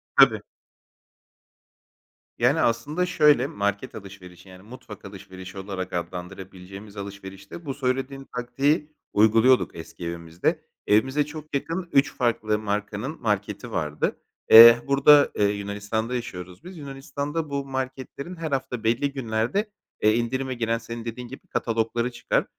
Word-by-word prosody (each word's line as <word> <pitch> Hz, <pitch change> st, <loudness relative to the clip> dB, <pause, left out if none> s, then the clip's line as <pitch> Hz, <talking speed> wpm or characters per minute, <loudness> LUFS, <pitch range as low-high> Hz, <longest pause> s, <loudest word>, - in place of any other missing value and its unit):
Tabii. -, -, +6 dB, 2.0 s
Yani, 135 Hz, +7 st, +3 dB
aslında 145 Hz, +10 st, 0 dB
şöyle: 150 Hz, -4 st, +4 dB
Market 100 Hz, 0 st, -3 dB
alışverişi, 95 Hz, -3 st, -12 dB
yani 90 Hz, 0 st, -13 dB
mutfak 105 Hz, -3 st, -12 dB
alışverişi 95 Hz, -1 st, -10 dB
olarak 95 Hz, -1 st, -5 dB
adlandırabileceğimiz 95 Hz, +3 st, -7 dB
alışverişte 100 Hz, -, -9 dB
bu 135 Hz, -, -3 dB
söylediğin 135 Hz, 0 st, -2 dB
taktiği 135 Hz, +5 st, 0 dB, 0.2 s
uyguluyorduk 115 Hz, +4 st, +4 dB
eski 85 Hz, +1 st, -9 dB
evimizde. 85 Hz, 0 st, -2 dB, 0.2 s
Evimize 130 Hz, +8 st, +3 dB
çok 155 Hz, 0 st, -8 dB
yakın 170 Hz, +5 st, -3 dB
3 140 Hz, +1 st, +3 dB
farklı 110 Hz, -3 st, 0 dB
markanın 105 Hz, +6 st, -3 dB
marketi 105 Hz, +1 st, -2 dB
vardı. 75 Hz, -6 st, -2 dB, 0.3 s
Eee, 115 Hz, +1 st, +12 dB
burada, 140 Hz, +1 st, +6 dB
eee, 105 Hz, -, +2 dB
Yunanistan'da 105 Hz, +3 st, -3 dB
yaşıyoruz 90 Hz, -6 st, -7 dB
biz. 180 Hz, 0 st, -10 dB
Yunanistan'da 145 Hz, +2 st, -5 dB
bu 140 Hz, -1 st, -2 dB
marketlerin 130 Hz, +5 st, -5 dB
her 165 Hz, -3 st, -5 dB
hafta 130 Hz, -3 st, -2 dB
belli 120 Hz, +6 st, +1 dB
günlerde, 125 Hz, -, -1 dB, 0.3 s
eee, 110 Hz, 0 st, +4 dB
indirime 130 Hz, +3 st, -1 dB
giren, 115 Hz, -1 st, -1 dB
senin 115 Hz, 0 st, -8 dB
dediğin 120 Hz, +2 st, -6 dB
gibi, 135 Hz, +3 st, -12 dB
katalogları 115 Hz, +1 st, -1 dB
çıkar. -, -, 0 dB
115 Hz, 125 wpm, -25 LUFS, 100-135 Hz, 2.0 s, Eee